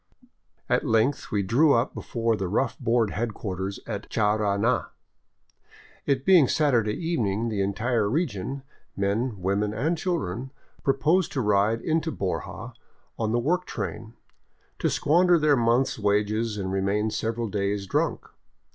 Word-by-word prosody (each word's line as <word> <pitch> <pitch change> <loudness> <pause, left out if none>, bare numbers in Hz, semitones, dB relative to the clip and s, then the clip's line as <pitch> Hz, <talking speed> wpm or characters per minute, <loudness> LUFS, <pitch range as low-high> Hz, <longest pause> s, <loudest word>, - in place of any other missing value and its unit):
At - - +1
length 115 +5 +1
we 100 -2 0
drew 140 +10 +4
up 120 +3 +1
before 115 -1 -1
the 95 -3 -3
rough 95 - 0
board 115 -2 +1
headquarters 100 -4 -4
at 105 -3 -6
Charana. 105 +2 +1 1.2
It 135 -2 +1
being 180 -8 +6
Saturday 120 -9 +2
evening, 115 - -1
the 105 -3 -1
entire 105 +2 0
region, 135 - -2 0.3
men, 105 +5 0
women, 100 +3 -1
and 155 +10 0
children, 135 - -3 0.3
proposed 150 +6 +2
to 135 - 0
ride 105 +1 +2
into 160 0 0
Borja 95 -9 -4 0.5
on 110 -1 0
the 120 - +2
work 170 +9 0
train, 115 +1 -5 0.6
to - - +1
squan 175 +5 +3
der 175 -1 +6
their 150 -2 +3
month's 120 +1 +1
wages 105 +2 0
and 95 -2 -3
remain 100 +3 0
several 115 +2 -2
days 100 -1 -2
drunk. 95 - -1
115 Hz, 140 wpm, -26 LUFS, 100-135 Hz, 1.2 s, being